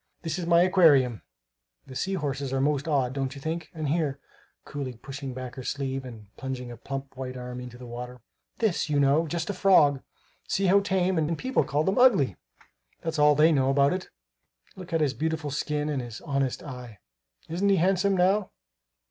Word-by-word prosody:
This 165 +3 -2
is 170 - -4
my 170 0 +6
aquarium; 145 - +4 0.6
the 130 - -11
sea 195 +8 -1
horses 140 -5 -3
are 135 - 0
most 140 +1 0
odd, 135 -5 +1
don't 135 0 -3
you - - -8
think? 160 +3 -4
And 155 -3 -4
here," 145 -2 0 0.5
coolly 140 -3 -5
pushing 135 +3 -7
back 130 -1 -6
her 130 - -8
sleeve 135 0 -3
and 110 -4 -12
plunging 130 -2 -5
a 120 - -9
plump, 135 +3 -6
white 130 -1 -6
arm 125 0 -6
into 125 -1 -9
the 125 - -10
water, 125 +1 -7 0.4
"this, 210 -8 0
you 145 -1 +2
know 140 +4 +3
just 170 +4 -2
a - - -5
frog! 155 -8 +4 0.5
See 195 - 0
how 195 +2 +5
tame! 190 -3 +1
And 160 +1 0
people 260 +1 +1
call 145 +2 0
them 190 +7 +1
ugly! 195 - +5 0.7
That's 165 -2 -2
all 150 0 +6
they 155 +3 +5
know 135 -3 +2
about 140 +2 +3
it. 185 - -5 0.7
Look 185 -2 -10
at 165 -1 +1
his 145 -3 +2
beautiful 160 -1 -2
skin 150 +1 -2
and 145 -3 -1
his 120 -2 -8
honest 140 -4 -1
eye! 125 -6 -9 0.5
Isn't 185 +5 0
he 195 - +5
handsome, 190 +2 +2
now? 190 +2 +2
145 Hz, 195 wpm, -27 LUFS, 130-170 Hz, 0.7 s, my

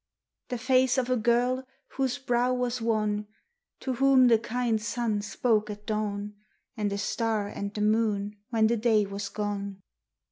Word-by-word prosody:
The 245 - -2
face 255 +1 +3
of 255 -1 0
a - - +4
girl 245 +3 +2 0.3
whose 265 -1 -1
brow 250 -2 +1
was 250 -1 -1
wan; 210 -2 0 0.5
To 260 - -2
whom 260 0 +5
the 230 -2 +5
kind 235 -1 -1
sun 225 -2 -1
spoke 215 0 0
at 210 0 -7
dawn, 210 -1 -2 0.4
And 210 -3 -1
a 200 - -2
star 215 0 -1
and 200 0 -5
the 210 - -4
moon 210 -1 +1
when 225 -3 +3
the 230 +2 +2
day 215 -2 +3
was 200 0 -5
gone. 200 -2 -4
225 Hz, 165 wpm, -28 LUFS, 210-245 Hz, 0.5 s, whom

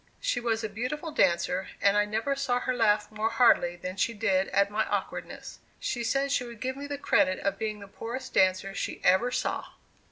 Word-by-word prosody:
She - - 0
was 230 -2 -1
a - - 0
beautiful 250 +10 -4
dancer, 180 - +1
and 200 0 +3
I 210 0 +4
never 220 +7 -1
saw 265 -3 0
her 255 - -1
laugh 215 -4 +2
more 215 +1 -1
heartily 225 -7 +4
than 185 +2 -6
she 230 +3 0
did 195 -3 +1
at 200 +1 +2
my 215 +1 +1
awkwardness. - - -4 0.2
She 240 - -2
said 275 +4 0
she 265 - +1
would 235 -2 -10
give 260 +2 -3
me 285 +1 -6
the 285 0 -4
credit 185 -8 +2
of 200 0 -1
being 215 -1 -3
the 200 - -9
poorest 240 +6 -7
dancer 185 +1 +2
she - - -4
ever 190 +7 +4
saw! - - -3
220 Hz, 210 wpm, -28 LUFS, 200-250 Hz, 0.2 s, I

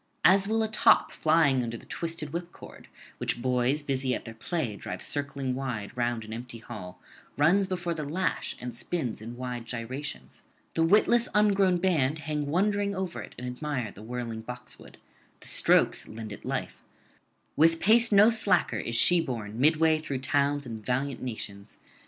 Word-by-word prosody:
As 190 +3 +6
whilome 220 +1 +1
a - - 0
top 215 - +4
flying 155 -5 +3
under 115 -1 -4
the - - -14
twisted 165 -3 -4
whipcord, 170 0 -8 0.3
which - - -1
boys 130 +4 +1
busy 130 -2 0
at - - -7
their 115 - -7
play 120 - -3
drive - - -6
circling 140 -2 -2
wide 125 -5 -4
round 120 -2 -1
an 110 - -7
empty 120 +1 -7
hall, 100 -6 -9 0.4
runs 180 +7 +4
before 175 -2 -2
the 160 - -4
lash 175 +6 -2
and 120 -1 -6
spins 120 -2 -3
in 115 +2 -8
wide 125 -2 -5
gyrations; 115 - -6 0.3
the 165 - 0
witless 215 +7 +4
ungrown 200 -3 +4
band 160 -6 +1
hang 150 -1 -3
wondering 200 +5 +1
over 185 -2 -3
it - - -11
and 125 - -6
admire 125 -2 -3
the 100 - -13
whirling 115 0 -5
boxwood; 125 +2 -10 0.4
the - - -11
strokes - - +3
lend 110 -1 -7
it - - -11
life: - - -4 0.7
with 165 +2 +4
pace 230 +3 +4
no 205 +3 +7
slacker 220 -4 +2
is 115 - -4
she 175 +8 +4
borne 115 -7 -5
midway 155 +2 +4
through 145 -3 -4
towns 140 +2 0
and 110 -3 -7
valiant 130 +3 -1
nations. 105 -4 -7
140 Hz, 170 wpm, -28 LUFS, 120-170 Hz, 0.7 s, no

